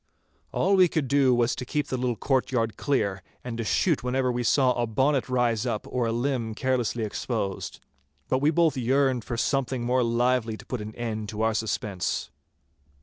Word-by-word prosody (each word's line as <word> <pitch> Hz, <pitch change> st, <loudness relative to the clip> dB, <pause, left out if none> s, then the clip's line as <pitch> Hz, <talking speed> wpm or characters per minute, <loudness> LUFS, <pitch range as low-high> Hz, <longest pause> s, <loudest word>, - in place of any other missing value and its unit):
All 195 Hz, -, +2 dB
we 185 Hz, -2 st, +6 dB
could 155 Hz, -4 st, -1 dB
do 140 Hz, -1 st, +4 dB
was 120 Hz, 0 st, +2 dB
to -, -, -5 dB
keep 145 Hz, +3 st, -2 dB
the -, -, -1 dB
little 125 Hz, -1 st, -1 dB
courtyard 125 Hz, -2 st, 0 dB
clear, 100 Hz, -9 st, 0 dB, 0.2 s
and 125 Hz, -2 st, -5 dB
to -, -, -1 dB
shoot 155 Hz, -, +1 dB
whenever 125 Hz, 0 st, +1 dB
we 120 Hz, 0 st, -2 dB
saw 125 Hz, +1 st, +3 dB
a 120 Hz, -1 st, -1 dB
bonnet 130 Hz, +4 st, +1 dB
rise 120 Hz, -3 st, +1 dB
up 105 Hz, -, -2 dB
or 125 Hz, -2 st, -1 dB
a -, -, 0 dB
limb 120 Hz, -2 st, -1 dB
carelessly 120 Hz, -3 st, 0 dB
exposed. 105 Hz, -2 st, -3 dB, 0.5 s
But 130 Hz, -, +1 dB
we 145 Hz, -, +4 dB
both 160 Hz, -2 st, +3 dB
yearned 130 Hz, 0 st, +1 dB
for 120 Hz, -, -4 dB
something 130 Hz, -1 st, 0 dB
more 125 Hz, +2 st, +2 dB
lively 120 Hz, -1 st, +1 dB
to -, -, -13 dB
put 125 Hz, -4 st, -4 dB
an 110 Hz, +1 st, -7 dB
end 110 Hz, -3 st, -4 dB
to 110 Hz, +1 st, -3 dB
our 110 Hz, 0 st, +2 dB
suspense. 105 Hz, -4 st, -2 dB
125 Hz, 190 wpm, -26 LUFS, 115-130 Hz, 0.5 s, we